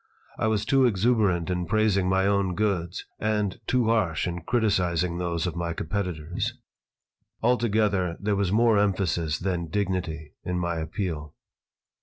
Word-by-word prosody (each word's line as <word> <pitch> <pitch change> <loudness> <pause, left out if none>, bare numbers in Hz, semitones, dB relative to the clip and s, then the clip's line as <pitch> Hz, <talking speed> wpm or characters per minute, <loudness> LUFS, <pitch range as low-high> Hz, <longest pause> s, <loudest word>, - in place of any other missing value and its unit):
I - - +2
was 110 -1 +1
too 135 +1 +4
exuberant 100 -5 +2
in 90 -1 -2
praising 100 -2 +2
my 95 0 +2
own 100 -2 +1
goods 95 -4 -1
and 105 -2 0
too 125 -2 +2
harsh 110 -9 +1
in 85 0 -4
criticising 90 -5 +1
those 85 -1 -1
of 90 - -3
my 85 -1 -2
competitors. 90 +4 -3 0.9
Altogether 105 -7 +2
there 105 0 0
was 100 -2 0
more 115 0 +4
emphasis 90 -6 +1
than 90 -2 -2
dignity 90 -6 -2
in 90 0 -2
my 85 -1 -1
appeal. 80 -2 -4
95 Hz, 140 wpm, -26 LUFS, 85-105 Hz, 0.9 s, too